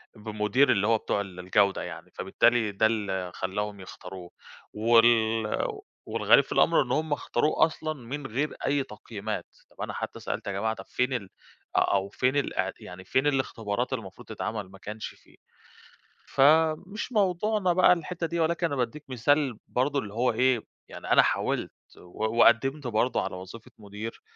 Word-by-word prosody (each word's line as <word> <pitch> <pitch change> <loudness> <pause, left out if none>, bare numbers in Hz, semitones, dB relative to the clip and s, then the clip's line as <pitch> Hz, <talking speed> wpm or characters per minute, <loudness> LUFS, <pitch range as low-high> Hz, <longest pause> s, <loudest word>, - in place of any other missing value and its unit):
بمدير 105 +5 +1
اللي 100 0 +2
هو 115 0 +4
بتوع 100 - -1
ال 95 -3 -9
الجودة 95 +2 +2
يعني، - - -8
فبالتالي 120 -3 +2
ده 100 +2 +2
اللي 95 -5 -2
خلّاهم 100 +2 -3
يختاروه 95 -1 -10 0.4
وال 115 0 +4 0.6
والغريب - - +4
في - - -17
الأمر - - +4
إن 125 - -7
هُم 155 +2 0
اختاروه 150 +2 +2
أصلًا 155 -1 -4
من 135 +1 -6
غير 135 +7 -2
أي 140 0 +2
تقييمات، 105 -2 -6 0.3
طَب - - -12
أنا - - -3
حتى - - -5
سألت - - -5
يا - - -1
جماعة 105 +3 -1
طَب - - -10
فين 125 +1 0
ال 105 -6 -3 0.5
أ - - +7
أو 100 0 +1
فين 130 +6 0
الأع 95 -9 0
يعني 90 +1 -10
فين 130 +3 +1
الاختبارات 125 -3 -1
المفروض 100 -7 -7
تتعمل؟ 105 -4 -5
ما 95 - -13
كانش 105 +2 -6
فيه. - - -17 0.9
فمش 160 - +2
موضوعنا 200 -2 +1
بقى 180 0 +6
الحِتّة 170 0 -3
دي 170 +1 -3
ولكن 170 +1 +1
أنا 145 - -3
بادّيك 130 +3 -2
مثال 130 0 +1
برضه 140 +3 0
اللي 105 -6 -7
هو 120 +3 +2
إيه، 130 -1 +2 0.3
يعني - - -7
أنا - - +8
حاولت - - 0 0.3
و 110 +6 -4
وقدّمت 135 +5 +4
برضه 120 +2 +1
على - - -4
وظيفة 95 +5 -10
مدير 105 +2 -8
115 Hz, 165 wpm, -27 LUFS, 105-145 Hz, 0.9 s, أنا